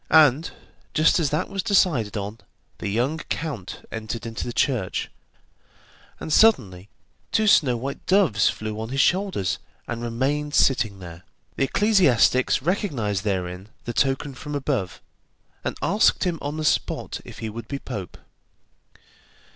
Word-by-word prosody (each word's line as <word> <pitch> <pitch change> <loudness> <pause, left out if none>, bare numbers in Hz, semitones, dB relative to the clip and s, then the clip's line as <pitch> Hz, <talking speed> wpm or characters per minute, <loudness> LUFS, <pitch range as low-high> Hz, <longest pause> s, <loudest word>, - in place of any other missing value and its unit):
And 155 -1 +5 0.5
just 155 +3 +4
as 155 -4 +1
that 150 - -1
was 195 -1 -3
decided 155 - +2
on, 105 +2 -5 0.4
the - - -4
young 125 +10 0
count 145 - -5
entered 110 +1 -5
into 115 -1 -4
the - - -3
church, 120 -6 -1 1.1
and 155 - -3
suddenly 105 - +3 0.4
two 220 - +2
snow 135 - +4
white 135 +4 -5
doves 185 - +4
flew 110 0 -5
on 110 - -5
his 135 +2 -2
shoulders 175 - +1 0.3
and 120 -1 -4
remained 140 +6 -1
sitting 110 -7 +3
there. 85 -2 -10 0.3
The 135 - +2
ecclesiastics 135 - +3
recognized 135 - -1
therein 95 -1 -3 0.2
the 120 - -3
token 135 +3 0
from 150 +3 -6
above, 130 -10 -2 0.6
and - - -3
asked 205 +2 +3
him 175 -4 -1
on 145 +2 -4
the 155 - -2
spot - - 0
if - - -11
he 110 - -4
would 115 0 -8
be 140 - -3
pope. 105 -10 -7
130 Hz, 145 wpm, -24 LUFS, 110-155 Hz, 1.1 s, And